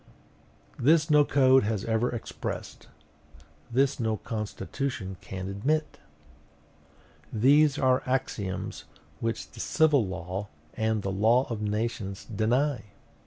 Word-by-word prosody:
This 150 +3 +4
no 150 -1 +7
code 135 -2 +5
has 105 -1 -2
ever 115 +2 +1
expressed; 120 - -6 0.8
this 135 +3 +1
no 110 -2 0
constitution 105 -2 -4
can 95 0 -6
admit! 145 +11 -1 1.3
These 140 +6 +4
are 130 0 +3
axioms 110 -7 -3 0.3
which 115 0 -3
the 115 - -13
civil 150 -1 +3
law 95 +1 -5 0.3
and 110 -2 0
the 95 - -2
law 115 +7 +3
of 110 -2 -3
nations 105 -2 -3
deny!..... 120 +4 0
115 Hz, 110 wpm, -28 LUFS, 105-135 Hz, 1.3 s, no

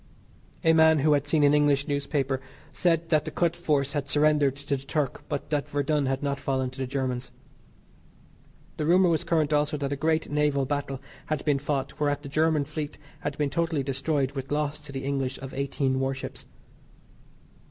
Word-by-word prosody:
A 160 -1 +5
man 160 0 +6
who 150 +1 +4
had 145 0 +1
seen 150 0 +3
an 145 0 +5
English 145 -1 +3
newspaper 140 -2 -1 0.3
said 165 -2 +1
that 155 -3 +3
the 155 - -4
Kut 170 +1 0
force 145 -5 0
had 145 -2 -2
surrendered 150 -2 +3
to 140 0 -2
the 135 - -7
Turk, 140 -1 -2
but 145 - -4
that 145 -2 0
Verdun 145 0 +1
had 135 +1 -1
not 140 -1 -1
fallen 130 -2 -1
to 130 - -12
the 130 - -2
Germans. 130 -1 -2 1.5
The 150 - -1
rumour 180 +1 +5
was 165 0 +1
current 160 -3 +1
also 150 +1 +1
that 140 -1 -2
a - - -1
great 160 +2 0
naval 145 -2 +2
battle 140 -1 -2 0.3
had 155 -2 -2
been 145 -3 +2
fought 140 -1 -3
whereat 145 -1 0
the 140 - -7
German 155 0 +2
fleet 150 0 -5 0.2
had 145 - -4
been 145 -2 0
totally 160 -1 0
destroyed 135 0 0
with 135 -1 -6
loss 150 0 -1
to 150 -2 -10
the 135 0 -5
English 135 -1 -1
of 135 -1 -8
eighteen 135 -1 0
warships. 135 0 -4
145 Hz, 190 wpm, -27 LUFS, 135-155 Hz, 1.5 s, man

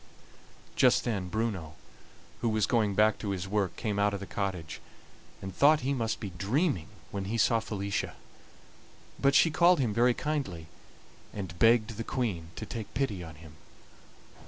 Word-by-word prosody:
Just - - +4
then 100 -6 -2
Bruno, 95 -8 -2 0.6
who 115 - 0
was 110 -2 +2
going 105 -4 +1
back 105 +1 +3
to 105 - -4
his 95 -1 -3
work, 100 -1 0
came 105 -3 -2
out 100 0 +2
of - - -5
the 100 - -6
cottage, 95 -6 -4 0.6
and 95 0 -6
thought 150 +2 +5
he 135 +2 0
must 115 -4 -1
be 100 -4 -5
dreaming 100 - 0 0.2
when 100 -1 -3
he 110 +4 -2
saw 115 +1 +3
Felicia; 100 -3 -3 1.0
but 140 0 +3
she 165 - +6
called 175 +3 +5
him 120 -6 +1
very 120 +2 +3
kindly, 135 - -3 0.7
and 95 -4 -7
begged 115 -1 +4
the 115 - -3
Queen 100 -11 -2
to - - -6
take 115 -3 -6
pity 110 -9 -1
on 80 -2 -10
him. 75 -1 -14
105 Hz, 165 wpm, -29 LUFS, 95-120 Hz, 1.0 s, she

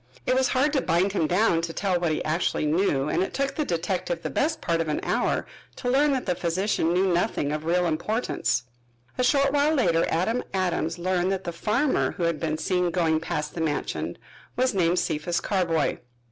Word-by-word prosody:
It - - +2
was 260 0 +3
hard 275 +4 +1
to 275 - +2
bind 180 +2 +1
him 165 -6 +1
down 180 -2 +2
to 165 0 -4
tell 185 -2 0
what 170 -2 0
he 155 - -1
actually 155 0 0
knew 150 -3 +1
and - - 0
it 190 - -2
took 275 0 0
the 305 - -1
detective 175 - -2
the - - -3
best 315 +2 0
part 165 -1 0
of 165 - -2
an 150 - -1
hour - - 0 0.3
to 245 - -2
learn 285 +3 +4
that 260 - -2
the 180 - +1
physician 170 0 0
knew 185 +1 +2
nothing 170 -5 0
of 155 +1 -3
real 175 +2 +2
importance. 165 - -1 0.6
A - - +3
short 275 +2 +3
while 295 +2 +3
later 170 - +2
Adam 220 +9 0
Adams 175 -3 -1
learned 185 +1 0
that 190 -1 -2
the 170 - -3
farmer 230 - +1
who 175 - -4
had 170 -2 0
been 155 -2 -1
seen 180 +1 0
going 165 -3 +1
past 150 -2 -3
the 165 - -4
mansion 150 -2 -2 0.4
was 255 0 +1
named 175 -2 +2
Cephas 170 +2 -1
Carboy. 175 -5 0
180 Hz, 205 wpm, -25 LUFS, 165-225 Hz, 0.6 s, learn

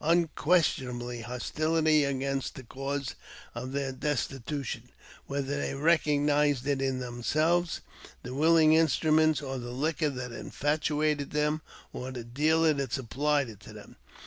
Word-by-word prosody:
Unquestionably 150 -7 +1
hostility 155 +6 +1
against 135 0 -2
the 130 - -8
cause 135 +2 -4 0.4
of 125 +2 -5
this 135 -1 -2 0.3
des 135 - -9
titution, 130 -2 -4 0.4
whether 140 0 -2
they - - -2
recognize 145 -3 +2
it 140 -1 0
in 135 -1 0
themselves, 155 +8 0 0.4
the 125 - -6
willing 155 +2 +5
instruments, 155 -1 +3
or 135 -1 -4
the 120 0 -6
liquor 150 +4 0
that 125 -3 -5
infatuated 150 +2 -1
them, 150 +1 0 0.3
or 125 - -5
the 125 -2 -6
dealer 155 +6 +2
that 140 -4 -3
supplied 140 +2 0
it 110 -4 -10
to - - -12
them. - - -12
140 Hz, 135 wpm, -29 LUFS, 130-155 Hz, 0.4 s, willing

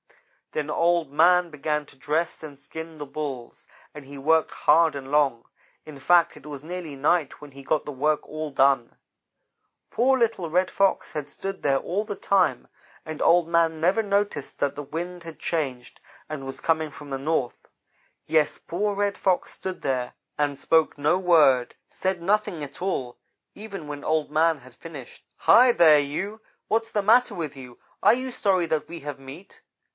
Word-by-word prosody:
"Then 150 0 -2
Old 170 -3 +1
man 175 +3 +4
began 150 0 -2
to - - -18
dress 155 +5 -2
and 145 -3 -9
skin 160 +2 -9
the 145 - -6
Bulls, 135 -5 -6 0.3
and 150 - -10
he 140 +1 -11
worked 160 +3 +2
hard 160 0 +3
and 135 -1 -7
long. 140 -6 +2 0.4
In 155 -2 -10
fact 170 +5 +3
it 150 -1 -15
was 145 -2 -8
nearly 170 -3 -6
night 145 +1 +1
when 145 -1 -12
he 140 +1 -12
got 150 +2 0
the 150 - -5
work 150 +3 0
all 155 0 -5
done. 135 -3 +2 0.9
"Poor 265 +3 +3
little 225 -8 0
Red 180 +3 +2
Fox 195 -1 +1
had 150 -2 -4
stood 195 +5 -6
there 140 -1 +3
all 185 +9 -2
the 205 -2 -6
time, 195 -2 +1 0.4
and 155 -1 -6
Old 170 0 +4
man 165 -1 +2
never 185 +7 +2
noticed 200 -7 -1
that 145 - 0
the 145 - -5
wind 175 +5 -6
had 165 -1 -10
changed 135 -7 -3 0.3
and 145 -3 -6
was 135 - -6
coming 160 -1 0
from 145 0 -12
the 135 - -2
north. 140 -4 -2 0.6
Yes, 155 -1 +2
poor 205 +4 -2
Red 200 0 -1
Fox 185 -2 0
stood 190 -1 -6
there 125 -2 -2 0.2
and 145 -2 -1
spoke 160 +1 +2
no 150 +5 +2
word; 155 -9 +4
said 190 -2 -2
nothing 195 -3 0
at 145 +3 -8
all, 130 -10 -3 0.4
even 200 -6 -8
when 145 -1 -7
Old 155 -2 0
man 160 +1 +3
had 130 -2 -16
finished. 145 -3 -11
"'Hi, 250 +1 +6
there, 160 -8 +6
you! 190 +10 -4 0.3
what's 225 +1 0
the 205 -2 -1
matter 235 +1 +4
with 155 -5 -4
you? 125 -3 -11 0.3
Are - - +6
you 255 +1 -5
sorry 190 -6 +1
that 160 -2 -2
we 170 0 -7
have 145 -1 -6
meat? 140 +9 -12
155 Hz, 180 wpm, -25 LUFS, 145-180 Hz, 0.9 s, Hi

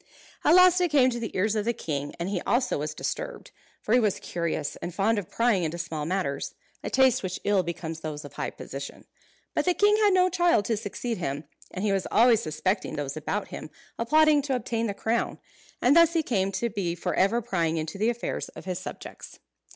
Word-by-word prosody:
At - - +6
last 365 0 +7
it 355 - +2
came 265 -4 +4
to 240 - -3
the 225 - -3
ears 210 +3 +1
of 210 - 0
the 235 +2 0
king, 145 -7 -4
and 170 - -2
he 190 -3 -2
also 250 - +1
was 150 +1 -4
disturbed. - - -5 0.3
For 215 - 0
he 250 - +6
was 210 -5 +1
curious, 170 -3 -3
and 175 - -6
fond 210 +3 +2
of 190 - -8
prying 230 -6 +2
into 165 +1 -2
small 160 -3 -4
matters; 180 -7 -2 0.3
a - - -3
taste 265 -2 +4
which 185 -1 -4
ill 205 -2 +3
becomes 165 -2 -5
those 155 -1 -6
of - - -11
high - - -3
position. - - -8 0.5
But - - 0
the 360 -1 +2
king 415 +1 +4
had 420 -2 +4
no 365 0 +5
child 345 - +2
to 225 - +1
succeed 220 +1 -4
him; 145 -3 -3 0.3
and 190 +3 -4
he 205 - +2
was 195 -1 -1
always 230 0 +5
suspecting 185 +3 -2
those 140 -2 -3
about 155 +7 -3
him - - -7 0.3
of 230 - -3
plotting 310 -1 +5
to 275 -1 -1
obtain 230 -2 -2
the 200 - -3
crown, 230 +3 -1 0.5
and 255 +5 +5
thus 335 0 +6
he 330 -2 +2
came 195 -8 0
to 235 +4 -1
be 185 -5 -2
for 175 - -3
ever 200 +5 +3
prying 170 -8 -1
into 160 +5 -4
the 220 +3 +2
affairs 240 0 -3
of - - -12
his 185 -1 -3
subjects. - - -9
205 Hz, 220 wpm, -27 LUFS, 170-245 Hz, 0.5 s, last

